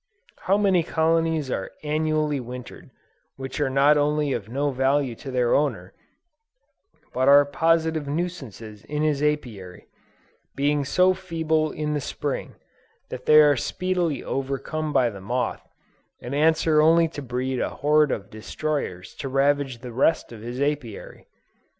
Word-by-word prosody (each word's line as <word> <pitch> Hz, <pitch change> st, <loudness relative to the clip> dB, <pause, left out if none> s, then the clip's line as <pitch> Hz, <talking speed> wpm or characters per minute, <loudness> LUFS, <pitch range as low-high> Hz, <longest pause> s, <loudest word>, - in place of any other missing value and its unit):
How 195 Hz, +2 st, +3 dB
many 195 Hz, -4 st, +3 dB
colonies 160 Hz, -3 st, 0 dB
are 95 Hz, -, -3 dB
annually 155 Hz, -1 st, 0 dB
wintered, 125 Hz, 0 st, -9 dB, 0.5 s
which 135 Hz, +2 st, -6 dB
are 145 Hz, -, +1 dB
not 140 Hz, +3 st, +4 dB
only 150 Hz, -1 st, +1 dB
of 110 Hz, -4 st, -5 dB
no 140 Hz, +4 st, -1 dB
value 135 Hz, 0 st, +1 dB
to 135 Hz, -, -9 dB
their 125 Hz, -2 st, +1 dB
owner, 145 Hz, 0 st, 0 dB, 1.2 s
but 130 Hz, +1 st, +1 dB
are 145 Hz, +1 st, +7 dB
positive 160 Hz, +1 st, +1 dB
nuisances 135 Hz, -, -5 dB
in 150 Hz, +1 st, -2 dB
his 150 Hz, -2 st, +1 dB
Apiary; 120 Hz, -12 st, -3 dB, 0.7 s
being 145 Hz, 0 st, +1 dB
so 185 Hz, +7 st, +3 dB
feeble 160 Hz, -4 st, -1 dB
in 150 Hz, 0 st, -3 dB
the 145 Hz, -, -1 dB
Spring, -, -, -4 dB, 0.5 s
that -, -, -8 dB
they 155 Hz, 0 st, +8 dB
are 145 Hz, -1 st, +4 dB
speedily 180 Hz, +2 st, -2 dB
overcome 140 Hz, +3 st, -3 dB
by 125 Hz, -4 st, +2 dB
the 100 Hz, -2 st, -10 dB
moth, 120 Hz, +6 st, -2 dB, 0.6 s
and 125 Hz, -, -7 dB
answer 155 Hz, +1 st, +3 dB
only 165 Hz, +2 st, +5 dB
to 150 Hz, -, -7 dB
breed 130 Hz, 0 st, -3 dB
a -, -, -1 dB
horde 150 Hz, -1 st, +2 dB
of 100 Hz, -1 st, -4 dB
destroyers 110 Hz, -4 st, -4 dB
to 135 Hz, -, -4 dB
ravage 135 Hz, -2 st, +1 dB
the 125 Hz, -2 st, -8 dB
rest 140 Hz, +5 st, +1 dB
of 115 Hz, -2 st, -10 dB
his 120 Hz, +3 st, -6 dB
Apiary. 140 Hz, -6 st, -4 dB
145 Hz, 145 wpm, -24 LUFS, 130-155 Hz, 1.2 s, they